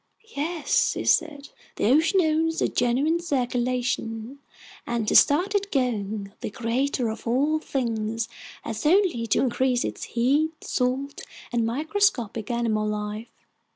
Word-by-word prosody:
"Yes," 315 +2 +1
he - - -4
said, 290 -3 +1 0.3
"the - - -1
ocean 325 +7 +4
owns 325 0 +1
a - - +2
genuine 265 +7 +1
circulation, 250 -4 -2 0.5
and 235 -2 -1
to - - +1
start 355 +8 +5
it 405 0 -1
going, 215 -6 -1
the - - -3
Creator 245 +3 -1
of 220 +2 -7
All 285 +6 +2
Things 230 -5 -2 0.4
has 220 -1 -5
only 335 - +3
to - - +2
increase 255 0 +1
its - - -5
heat, 285 +7 +1
salt, 265 +3 -2 0.3
and 235 -2 +1
microscopic 255 - 0
animal 230 -3 0
life. 210 +1 -4
250 Hz, 130 wpm, -25 LUFS, 230-310 Hz, 0.5 s, start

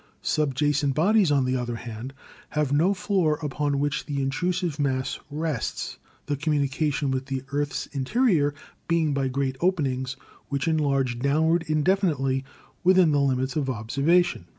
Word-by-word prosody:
Subjacent 145 -1 +1
bodies, 195 +1 +4
on 140 -3 +3
the 130 0 0
other 120 -2 -2
hand, 115 +2 -7 0.4
have 150 -2 0
no 165 +7 +4
floor 190 -6 +1
upon 145 0 -1
which 145 0 -1
the 145 -2 -2
intrusive 170 +4 -1
mass 130 -2 -1
rests, 150 -4 -3 0.3
the 145 - -1
communication 145 0 0
with 130 0 -2
the 135 -1 -3
earth's 145 0 -1
interior 145 - +1 0.3
being 165 -3 +2
by 135 -1 0
great 130 0 -1
openings 135 -8 0 0.3
which 140 +3 -1
enlarge 140 -6 +1
downward 160 +5 +2
indefinitely 155 -5 +1 0.4
within 185 -3 +5
the 145 -1 +3
limits 130 0 0
of 145 -4 0
observation. 140 +10 +1
145 Hz, 140 wpm, -25 LUFS, 135-160 Hz, 0.4 s, within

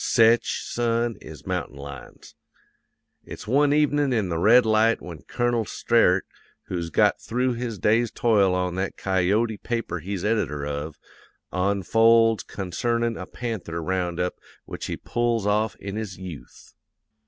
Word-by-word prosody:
Sech, 115 0 +5
son, 115 -1 -1
is 75 -3 -11
mountain 70 - -3
lions. 70 -1 -10 0.9
"It's - - -9
one 140 +5 +3
evenin' 145 -1 +2
in 110 -6 0
the 85 -1 -1
Red 115 +6 +6
Light 110 +1 +3
when 85 -4 -9
Colonel 120 -1 0
Sterett, 100 -4 +2 0.4
who's 85 -2 -4
got - - +2
through 125 +2 0
his 120 -2 -4
day's 115 +5 +2
toil 100 -6 +2
on 90 -1 -1
that 95 +1 -3
Coyote 100 +4 +1
paper 115 -7 -3
he's 95 +3 -4
editor 75 -10 0
of, 75 +1 -5 0.6
onfolds 110 +4 +3
concernin' 115 +5 -2
a 90 - -7
panther 110 -9 -5
round 90 0 -2
up 90 0 -2 0.3
which - - -6
he - - -4
pulls 120 -3 -1
off 105 +1 +1
in 100 +1 -6
his 105 -4 -5
yooth. 90 -6 -11
105 Hz, 140 wpm, -24 LUFS, 90-115 Hz, 0.9 s, Red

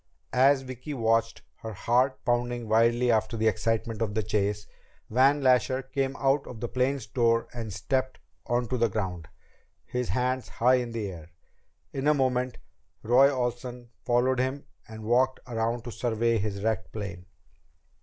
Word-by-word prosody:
As 135 +1 +4
Vicki 130 +3 -7
watched, 115 -1 +1
her 110 -1 -7
heart 125 +6 +1
pounding 120 -1 0
wildly 115 +2 +3
after 110 0 +1
the 110 0 +2
excitement 115 +1 -1
of 105 -2 -1
the 110 - +1
chase, 105 +1 -1 0.5
Van 135 +4 +4
Lasher 130 +1 +3
came 135 +1 -2
out 140 +1 +1
of 120 - -8
the 120 - -3
plane's 130 0 0
door 115 +1 +1
and 115 -3 -5
stepped 130 +6 -1 0.3
onto 120 0 0
the 115 -1 +2
ground, 90 -6 -3 0.6
his 125 -1 -3
hands 125 -1 -1
high 125 +2 +3
in 120 -1 -5
the 115 -3 -3
air. 85 -2 -11 0.6
In 135 +1 -2
a 150 - +5
moment 130 -2 0 0.5
Roy 125 +5 +6
Olsen 125 -2 -4
followed 125 +1 +2
him 130 +2 -1 0.2
and 110 0 -9
walked 125 +4 +2
around 115 -1 -2
to 120 - -6
survey 115 -1 0
his 100 -1 -3
wrecked 110 0 -1
plane. 100 -4 -7
120 Hz, 155 wpm, -27 LUFS, 110-130 Hz, 0.6 s, Roy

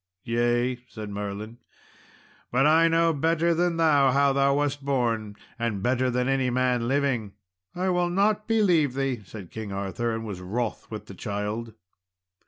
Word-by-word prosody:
"Yea," 120 +1 +1
said 105 -2 -7
Merlin, 105 +3 -6 0.9
"but 130 +3 +3
I 160 +2 +5
know 165 0 +3
better 165 +3 +2
than 170 0 +1
thou 145 -4 +4
how 140 +1 +3
thou 140 0 +3
wast 145 -1 -1
born, 115 -6 -1 0.2
and 110 -5 -2
better 130 +1 +1
than 125 +1 0
any 135 -1 +1
man 125 -1 +1
living." 130 -6 0 0.4
"I 185 +1 0
will 180 -1 +1
not 205 +4 +1
believe 180 - +3
thee," 135 -4 -1
said 100 -2 -10
King 110 -2 -6
Arthur, 100 +4 -2
and 115 0 -5
was 100 -4 -6
wroth 110 +5 -3
with 110 -1 -7
the - - -10
child. 105 +3 -4
125 Hz, 160 wpm, -26 LUFS, 110-145 Hz, 0.9 s, I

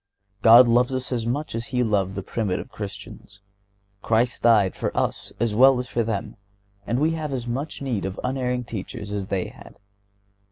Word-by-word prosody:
God 120 +2 +8
loves 125 +3 +3
us 130 0 -4
as 120 -2 -2
much 145 +6 -2
as 115 +1 -4
He 125 -1 0
loved 100 -4 0
the 95 - -4
primitive 100 -3 -3
Christians; 100 0 -9 0.6
Christ 115 +3 +1
died 110 -5 +4
for - - -2
us - - -1
as 115 -1 0
well 130 +4 +6
as 125 0 -3
for 120 - -1
them 110 -2 -3 0.5
and 120 - 0
we 155 +4 +2
have 155 -2 -3
as 125 -3 -3
much 135 +5 -4
need 120 -8 -2
of 95 0 -4
unerring 125 -1 -1
teachers 105 -1 -7
as 100 -2 -3
they 95 -2 -2
had. - - -15
115 Hz, 185 wpm, -24 LUFS, 105-125 Hz, 0.6 s, God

